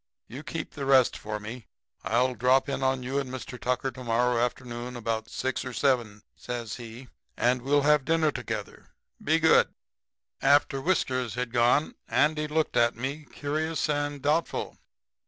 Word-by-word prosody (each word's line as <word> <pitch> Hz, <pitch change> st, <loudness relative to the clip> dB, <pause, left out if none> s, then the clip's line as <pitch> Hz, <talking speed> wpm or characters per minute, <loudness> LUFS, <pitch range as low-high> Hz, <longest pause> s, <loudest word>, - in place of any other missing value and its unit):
'You 130 Hz, +6 st, -8 dB
keep 160 Hz, +1 st, -5 dB
the 140 Hz, -3 st, -5 dB
rest 130 Hz, -2 st, +5 dB
for 105 Hz, 0 st, -5 dB
me. 110 Hz, +2 st, -8 dB, 0.4 s
I'll 120 Hz, +5 st, +2 dB
drop 125 Hz, +3 st, +3 dB
in 140 Hz, -1 st, -2 dB
on 130 Hz, -1 st, +1 dB
you 135 Hz, +3 st, -1 dB
and 135 Hz, -2 st, -4 dB
Mr. 125 Hz, -1 st, -7 dB
Tucker 125 Hz, +1 st, 0 dB
to 130 Hz, -, -10 dB
morrow 120 Hz, 0 st, +2 dB
afternoon 125 Hz, 0 st, -4 dB
about 115 Hz, -1 st, -3 dB
6 130 Hz, 0 st, -2 dB
or 125 Hz, -, -6 dB
7,' 120 Hz, -6 st, 0 dB
says 120 Hz, -3 st, -5 dB
he, 120 Hz, +2 st, -10 dB, 0.3 s
'and 125 Hz, +2 st, +2 dB
we'll 140 Hz, +3 st, +2 dB
have 150 Hz, -1 st, +4 dB
dinner 160 Hz, -1 st, +2 dB
together. -, -, -6 dB, 0.4 s
Be 155 Hz, +2 st, +3 dB
good.' 160 Hz, 0 st, +4 dB, 0.7 s
"After 140 Hz, 0 st, +3 dB
Whiskers 130 Hz, -, 0 dB
had 125 Hz, -1 st, -3 dB
gone 120 Hz, +5 st, +3 dB
Andy 150 Hz, 0 st, +2 dB
looked 155 Hz, -4 st, 0 dB
at 120 Hz, 0 st, +3 dB
me 135 Hz, +6 st, -4 dB
curious 155 Hz, +3 st, -2 dB
and 145 Hz, -2 st, -1 dB
doubtful. 155 Hz, +3 st, -1 dB
130 Hz, 160 wpm, -27 LUFS, 120-145 Hz, 0.7 s, rest